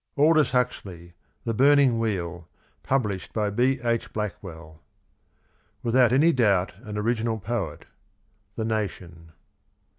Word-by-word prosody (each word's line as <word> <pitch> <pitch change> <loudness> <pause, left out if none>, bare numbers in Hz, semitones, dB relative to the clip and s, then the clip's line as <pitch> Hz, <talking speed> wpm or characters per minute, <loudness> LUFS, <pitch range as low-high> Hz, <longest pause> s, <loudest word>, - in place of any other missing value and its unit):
Aldous 155 +1 +4
Huxley. 95 -9 -3 0.3
THE 115 - -2
BURNIXG 140 +2 +5
WHEEL. 90 -6 -3 0.3
Published 105 -9 -2
by 105 -2 0
B. 125 +5 +2
II. 115 0 +2
Blackvvell. 85 -7 -6 0.5
" - - -41
Without 120 0 +4
any 150 +6 +5
doubt 100 - +2
an 105 -3 -7
original 115 +1 0
poet." 100 -6 -4 0.4
— 105 0 -43
The 110 - -2
Nation. 90 -7 -4
110 Hz, 120 wpm, -25 LUFS, 95-125 Hz, 0.5 s, BURNIXG